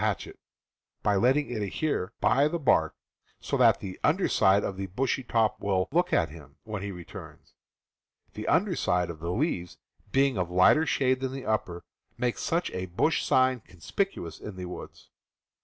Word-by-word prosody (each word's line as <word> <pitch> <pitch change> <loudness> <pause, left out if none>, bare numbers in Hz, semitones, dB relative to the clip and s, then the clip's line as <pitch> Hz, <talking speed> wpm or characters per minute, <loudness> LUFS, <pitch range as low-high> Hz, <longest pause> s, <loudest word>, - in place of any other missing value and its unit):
he - - -1
hatchet, - - -4 0.6
but 100 -2 +2
letting 135 +3 +2
it 110 -3 -3
adhere 105 - -2
by 135 +6 +4
the 170 - -2
bark 80 - +2 0.4
so - - -3
that - - +5
the 95 - -5
Fig. - - -18
10. - - +4
under 185 +6 +1
side 95 +1 +4
of 95 - -3
the 95 0 -4
bushy 130 +8 -1
top 115 -3 +1
will 95 -2 0
"look 175 +4 +2
at 80 - +2
him" 75 -2 -13
when 105 -3 -5
he 100 0 -4
returns. 90 -2 -11 0.8
The 105 - -6
under 180 +1 +2
side 90 - 0
of 80 - -11
the 85 +2 -4
leaves, 90 - -2 0.3
being 135 -4 +2
of 90 -1 -1
lighter 95 - +5
shade 130 -1 +2
than 130 0 -3
the 135 -1 -6
upper, 90 -5 -2 0.3
makes 120 0 -1
such 170 +2 -1
a 95 0 -4
bush 120 - +1
sign 130 -1 +3
conspicuous 90 - -4
in 105 - -8
the 90 0 -6
woods. 90 - -10
105 Hz, 190 wpm, -28 LUFS, 90-135 Hz, 0.8 s, that